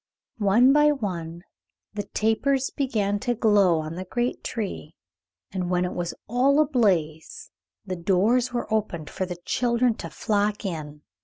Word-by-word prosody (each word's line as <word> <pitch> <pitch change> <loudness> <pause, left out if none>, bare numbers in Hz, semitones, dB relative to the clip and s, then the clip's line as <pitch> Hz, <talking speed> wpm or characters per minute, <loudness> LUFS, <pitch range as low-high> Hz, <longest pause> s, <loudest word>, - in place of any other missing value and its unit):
One 225 +6 +5
by 295 0 +5
one 175 - -4 0.5
the 210 - -2
tapers 255 +5 0
began 210 -7 -1
to 240 +3 -1
glow 200 -7 +3
on 155 +1 -6
the 180 +2 -5
great 240 +6 -2
tree, 200 -8 -5 0.6
and 185 -2 -3
when 180 0 +1
it 180 - -4
was 175 -1 -3
all 260 +5 +3
ablaze 190 - 0 0.3
the 185 -2 -4
doors 205 +8 +2
were 240 -2 -3
opened 170 -8 -2
for 185 - -3
the 180 -1 -6
children 240 0 +1
to 165 - -6
flock 210 +3 -1
in. 150 -5 -5
205 Hz, 150 wpm, -25 LUFS, 175-240 Hz, 0.6 s, One